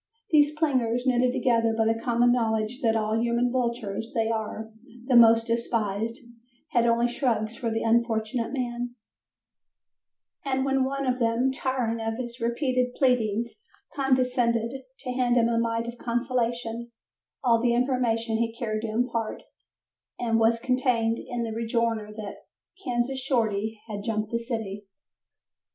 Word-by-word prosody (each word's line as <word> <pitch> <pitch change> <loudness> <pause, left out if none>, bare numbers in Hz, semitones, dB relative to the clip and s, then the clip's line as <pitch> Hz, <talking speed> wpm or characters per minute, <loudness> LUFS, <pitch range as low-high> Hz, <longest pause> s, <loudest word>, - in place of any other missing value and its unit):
These 300 -1 +4
plingers, 250 -6 +1
knitted 250 -1 +3
together 230 -3 +2
by 225 - +3
the 225 0 +1
common 240 0 +3
knowledge 225 +1 0
that 225 -3 +2
of 220 - +1
all 215 +1 0
human 235 +1 +1
vultures 235 -4 -2
they 225 -1 +1
are 220 0 -3 0.3
the 255 -1 +2
most 230 -1 +7
despised, 230 -1 -1 0.5
had 235 -1 +3
only 235 +1 +3
shrugs 235 -3 -1
for 235 -1 -2
the 225 0 -1
unfortunate 230 0 +1
man, 245 -2 -3 1.5
and 265 -2 0
when 270 -1 +2
one 275 +1 -2
of 255 0 0
them, 235 +3 +2
tiring 255 -4 -1
of 225 0 -2
his 240 -1 -6
repeated 250 +1 0
pleadings, 235 -3 +1 0.4
condescended 250 -4 +1 0.3
to 255 - -4
hand 250 -1 +1
him 235 -1 +4
a 230 -1 +1
mite 230 0 -1
of 235 0 -7
consolation, 235 -1 -2 0.5
all 230 -3 +4
the 240 0 +2
information 240 -3 +1
he 230 0 -1
cared 215 -3 -2
to 225 - -3
impart 230 0 -2 0.8
was 230 -1 +2
contained 245 -2 +1
in 245 -1 -4
the 225 - -3
rejoinder 230 -1 -1
that 210 -1 -7 0.5
"Kansas 250 0 -1
Shorty 220 -5 0
had 205 -2 -5
jumped 215 -1 -2
the 235 - 0
city." 220 -4 -5
235 Hz, 145 wpm, -26 LUFS, 225-250 Hz, 1.5 s, most